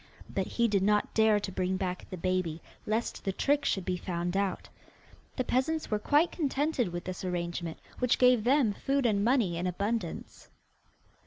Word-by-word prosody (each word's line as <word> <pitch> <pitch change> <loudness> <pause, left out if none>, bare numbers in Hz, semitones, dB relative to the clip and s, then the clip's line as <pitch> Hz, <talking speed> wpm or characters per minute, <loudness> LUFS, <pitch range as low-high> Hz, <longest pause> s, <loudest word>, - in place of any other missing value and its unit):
But - - -2
he 235 0 +1
did 200 -3 +1
not 210 +1 +2
dare 220 -1 +4
to 200 -1 -5
bring 185 0 -1
back 185 -1 -4
the 185 - -6
baby, 185 -2 -1 0.3
lest 220 +2 -1
the 195 - 0
trick 285 +9 +1
should 190 -8 0
be 180 -1 -1
found 175 0 -3
out. 195 -1 -1 0.7
The 255 - 0
peasants 275 +5 0
were 210 - +1
quite 295 +9 +3
contented 290 - 0
with 175 0 -5
this 185 0 -6
arrangement, 170 -2 -3 0.2
which 250 -1 +2
gave 250 -3 +5
them 250 -3 +3
food 275 +4 0
and 205 -3 +2
money 225 -8 +2
in 180 - -1
abundance. 205 +6 -3
205 Hz, 175 wpm, -30 LUFS, 185-250 Hz, 0.7 s, gave